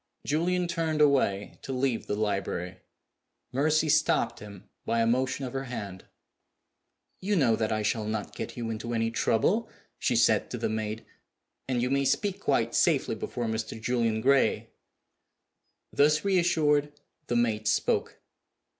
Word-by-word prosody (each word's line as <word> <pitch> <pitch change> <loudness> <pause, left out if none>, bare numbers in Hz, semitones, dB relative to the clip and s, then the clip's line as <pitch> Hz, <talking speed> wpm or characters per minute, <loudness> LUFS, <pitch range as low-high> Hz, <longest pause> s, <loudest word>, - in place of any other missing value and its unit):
Julian 175 +4 0
turned 165 -3 -1
away 135 -9 +2
to - - -6
leave 130 -2 -1
the 105 - -1
library. 100 -4 -2 0.7
Mercy 155 +4 +2
stopped 155 0 +2
him 105 -1 -12 0.2
by 115 - 0
a 115 - +3
motion 130 +3 0
of 125 - -6
her 135 0 -3
hand. 100 -7 -7 1.1
"You 205 +2 0
know 130 - +3
that 110 0 -1
I 110 -1 0
shall 110 +1 0
not 110 -1 -4
get - - -6
you 115 -1 -3
into 115 +2 -4
any 115 0 0
trouble," 200 - +1 0.3
she - - +1
said - - +3
to - - -4
the - - -1
maid. 110 0 -3 0.6
"And 125 -2 0
you 125 - -1
may 140 0 +2
speak 200 +6 0
quite - - 0
safely - - +2
before 120 - -4
Mr. 110 0 -3
Julian 115 -1 0
Gray." 135 +2 +2 1.2
Thus 150 +4 +3
re 195 -2 +3
assured, 150 -4 +2 0.3
the 120 - -1
maid 110 -3 +1
spoke. 105 - 0
125 Hz, 155 wpm, -28 LUFS, 110-150 Hz, 1.2 s, a